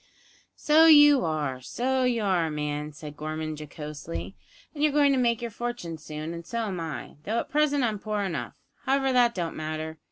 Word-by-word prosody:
"So 315 +2 +5
you 295 -3 +8
are, 150 -5 -2
so 260 - -1
you 235 -3 +1
are, 180 -5 +1
man," 150 0 -3
said 150 0 -10
Gorman 155 +1 -4
jocosely, 150 - -7 0.4
"and 295 - -6
you're 300 0 +4
going 285 -1 +4
to 270 - +2
make 235 -1 +1
your 235 - -4
fortune 230 -8 -5
soon, 155 +2 -6
and 170 0 -7
so 230 +7 -3
am 190 -4 -4
I, 160 -3 -6
though 220 +6 -2
at - - -2
present 290 -2 +2
I'm 215 -4 0
poor 210 -1 -2
enough. 190 -3 -4 0.3
However, 270 0 +2
that 240 -1 +4
don't 170 -3 -3
matter. 155 0 -5
185 Hz, 190 wpm, -27 LUFS, 155-250 Hz, 0.4 s, you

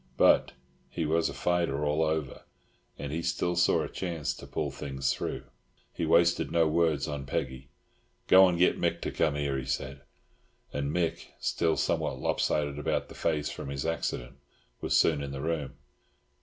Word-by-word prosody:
But - - +5 0.4
he 85 - -2
was 80 +2 +2
a - - -6
fighter 85 -5 0
all 75 +2 +1
over, 80 -3 -1 0.6
and 70 - -5
he 80 +2 -2
still 85 +1 -1
saw 85 +1 +3
a - - -3
chance 85 -5 -3
to - - -11
pull - - -2
things 70 0 -2
through. - - -4 0.5
He 85 - -2
wasted 85 +1 +3
no 85 -1 +3
words 80 -3 +1
on 70 -3 -5
Peggy. 65 +1 -3 0.6
"Go 95 0 +8
and 90 -2 0
get 90 - +3
Mick - - 0
to - - -2
come 75 -3 +1
here," 70 -2 -1
he 65 - -6
said, 70 +1 -3 0.7
and 70 0 -1
Mick, 85 0 -1
still 80 -2 +1
somewhat - - 0
lopsided 75 -1 0
about 75 - -1
the - - -10
face 75 -3 -1
from - - -6
his 70 -1 -3
accident, 65 -6 -3 0.4
was - - +2
soon 75 -3 +3
in 70 - -4
the 70 - -5
room. 80 -3 -2
75 Hz, 175 wpm, -29 LUFS, 70-85 Hz, 0.7 s, Go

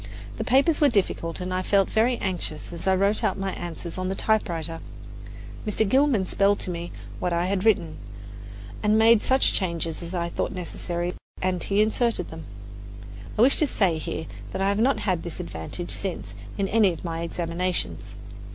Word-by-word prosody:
The - - -2
papers 280 +6 +3
were 290 - +6
difficult, 185 -6 0
and 180 0 -3
I 185 - 0
felt 195 +1 +3
very 235 +3 +2
anxious 175 -6 -4
as 170 - -6
I 190 - +5
wrote 200 +3 +2
out - - +1
my 195 0 -2
answers 175 +1 -6
on 185 - -1
the 190 - -1
typewriter. 170 -8 0 0.8
Mr. 215 0 0
Gilman 260 -4 +3
spelled 200 +2 +2
to 180 - -1
me 170 0 -5 0.3
what 180 - -1
I 170 +1 +1
had 190 0 0
written, 180 -8 +2 0.8
and 210 0 +3
I - - +5
made 225 0 +6
such 265 0 +3
changes 170 -4 -2
as 170 +2 -6
I 170 -1 -1
thought - - -2
necessary, 175 -1 -3 0.3
and 180 -2 0
he 205 +1 +3
inserted 230 +2 0
them. - - -8 0.9
I 220 - +6
wish 270 - +6
to 305 - +3
say 180 - +1
here 160 +1 -4 0.3
that - - -3
I 195 - +3
have 200 +1 +1
not 265 +5 +2
had 185 -5 0
this 170 -1 -6
advantage 85 - -5
since 175 - -2 0.2
in 200 -1 0
any 210 -3 +4
of 165 - -9
my 165 -1 -3
examinations. 170 - -2
185 Hz, 190 wpm, -25 LUFS, 170-215 Hz, 0.9 s, were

